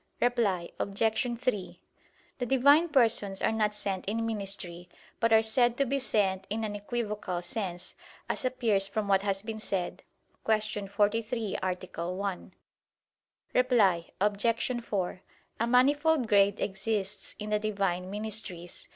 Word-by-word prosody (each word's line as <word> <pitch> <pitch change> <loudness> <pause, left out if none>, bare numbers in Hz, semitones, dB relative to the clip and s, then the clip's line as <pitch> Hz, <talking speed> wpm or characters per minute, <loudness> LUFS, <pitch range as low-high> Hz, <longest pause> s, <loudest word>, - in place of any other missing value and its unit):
Reply 215 -8 +1
Obj. 225 +4 0
3: 210 -7 -2 0.6
The 245 - 0
Divine 285 +7 +5
Persons 225 -8 +2
are - - +3
not 215 -1 +1
sent 195 -3 -3
in 225 +3 -1
ministry, 195 -5 -3 0.3
but 230 -1 +2
are 220 0 +6
said 240 +2 +2
to 275 - +2
be 275 +2 0
sent 195 -6 0
in 220 +2 -2
an 210 -1 -3
equivocal 205 -4 -3
sense, 180 -1 -5 0.3
as - - -2
appears 230 -6 +1
from 215 0 -2
what 195 -1 +4
has 195 -1 -1
been 220 0 -5
said 195 -4 -3 0.4
(Q. 215 -2 0
43, 215 +2 0
A. 180 -2 -3
1). 195 0 -4 1.0
Reply 205 -9 +3
Obj. 230 +4 +1
4: 185 -4 -2 0.4
A 230 - +1
manifold 285 +3 +4
grade 200 -1 +4
exists 200 0 -3
in 210 0 -5
the 210 - +3
Divine 195 -4 -1
ministries. 205 -4 -3
210 Hz, 135 wpm, -29 LUFS, 195-230 Hz, 1.0 s, are